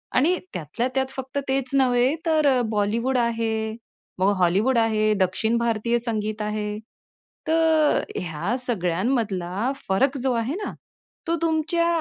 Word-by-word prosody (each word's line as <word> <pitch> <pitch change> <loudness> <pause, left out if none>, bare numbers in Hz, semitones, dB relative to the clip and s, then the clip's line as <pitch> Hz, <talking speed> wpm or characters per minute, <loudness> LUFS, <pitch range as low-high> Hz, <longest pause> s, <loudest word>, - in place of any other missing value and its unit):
आणि 340 +7 +3 0.2
त्यातल्या 175 - -2
त्यात 265 0 +1
फक्त 265 +1 -6
तेच 265 -1 0
नव्हे 255 +1 +3
तर 300 -6 +3
बॉलिवूड 225 +5 0
आहे, 225 -2 -1 0.4
मग 190 +2 +4
हॉलिवूड 195 +8 +2
आहे, 215 -2 +2
दक्षिण 205 +5 +1
भारतीय 235 0 +1
संगीत 215 -2 -2
आहे. 210 0 -2 0.7
तर 320 -1 +3 0.2
ह्या 175 +6 -2
सगळ्यांमधला 200 -1 -1 0.2
फरक 265 +9 +2
जो 260 0 +1
आहे 235 +5 -1
ना - - -4 0.5
तो 335 - +2
तुमच्या 330 +1 +1
235 Hz, 125 wpm, -24 LUFS, 210-265 Hz, 0.7 s, मग